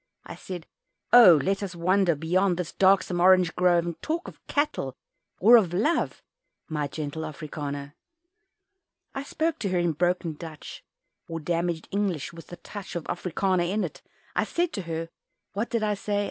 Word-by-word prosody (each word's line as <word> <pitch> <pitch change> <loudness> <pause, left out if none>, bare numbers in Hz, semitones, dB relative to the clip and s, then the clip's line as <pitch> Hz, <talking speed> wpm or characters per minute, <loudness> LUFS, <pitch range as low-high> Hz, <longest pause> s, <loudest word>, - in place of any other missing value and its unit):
I - - -8
said, 180 -3 -8 0.5
"Oh! 190 -10 +9
let 195 +5 0
us 190 -3 -5
wander 180 0 +2
Beyond 175 +4 +1
this 180 -3 -3
darksome 190 -2 +3
orange 185 -2 +5
grove, 175 -1 +3
And 170 -1 -5
talk 335 +2 -2
of - - -11
cattle 210 - -1 0.4
or 235 +6 +8
of 180 -6 +1
Love 300 - 0 0.4
My 150 -3 -2
gentle 150 +2 -5
Afrikander." 145 -2 -6 1.2
I 270 - -3
spoke 315 +3 -2
to 200 - -1
her 185 - 0
in 175 -1 +2
broken 175 +1 0
Dutch, 155 -1 -9 0.4
Or 165 0 -4
damaged 170 +1 -2
English 190 -7 -1
with 165 0 -12
a - - -6
touch 200 +1 -9
Of 170 - -3
"Afrikander" 180 +1 -1
in 205 +2 0
it. 175 - -6 0.3
I - - +2
said 345 0 -1
to 200 - -3
her 165 0 -3 0.4
what 210 +4 -2
did 230 -2 -1
I 210 -1 +1
say? 205 0 -2
180 Hz, 170 wpm, -26 LUFS, 165-200 Hz, 1.2 s, Oh